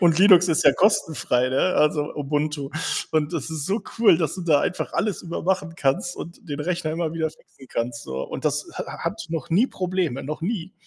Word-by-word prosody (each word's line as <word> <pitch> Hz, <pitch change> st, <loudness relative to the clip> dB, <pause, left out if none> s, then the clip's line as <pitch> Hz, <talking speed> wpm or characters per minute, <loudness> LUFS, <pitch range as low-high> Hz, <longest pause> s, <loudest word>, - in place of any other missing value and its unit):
Und 170 Hz, -3 st, +4 dB
Linux 185 Hz, -3 st, +8 dB
ist 160 Hz, -, +2 dB
ja 140 Hz, -, +8 dB
kostenfrei, 150 Hz, -, +2 dB
ne, 130 Hz, -, +1 dB
also 150 Hz, 0 st, +2 dB
Ubuntu. 145 Hz, 0 st, -2 dB, 0.4 s
Und 155 Hz, 0 st, +1 dB
das 160 Hz, -2 st, -3 dB
ist 155 Hz, -2 st, -4 dB
so 200 Hz, +4 st, -1 dB, 0.2 s
cool, 220 Hz, -8 st, +6 dB
dass 160 Hz, -4 st, -1 dB
du 185 Hz, -, -5 dB
da 155 Hz, -4 st, +4 dB
einfach 180 Hz, -, -2 dB
alles 210 Hz, -3 st, -1 dB
über 170 Hz, -1 st, -5 dB
machen 180 Hz, -2 st, 0 dB
kannst 145 Hz, +5 st, 0 dB
und 170 Hz, +1 st, -9 dB
den 145 Hz, 0 st, -4 dB
Rechner 170 Hz, -1 st, -1 dB
immer 160 Hz, -1 st, -2 dB
wieder 160 Hz, -1 st, -1 dB
fixen 135 Hz, -3 st, -19 dB
kannst, 115 Hz, 0 st, -3 dB
so. 65 Hz, 0 st, -4 dB
Und -, -, -6 dB
das -, -, 0 dB
ha -, -, -4 dB
ha -, -, -8 dB
hat -, -, -3 dB
noch 165 Hz, 0 st, -4 dB
nie 210 Hz, +10 st, +4 dB
Probleme, 180 Hz, -, -2 dB
noch 150 Hz, +4 st, -5 dB
nie. 185 Hz, -2 st, -3 dB
160 Hz, 215 wpm, -24 LUFS, 145-180 Hz, 0.4 s, Linux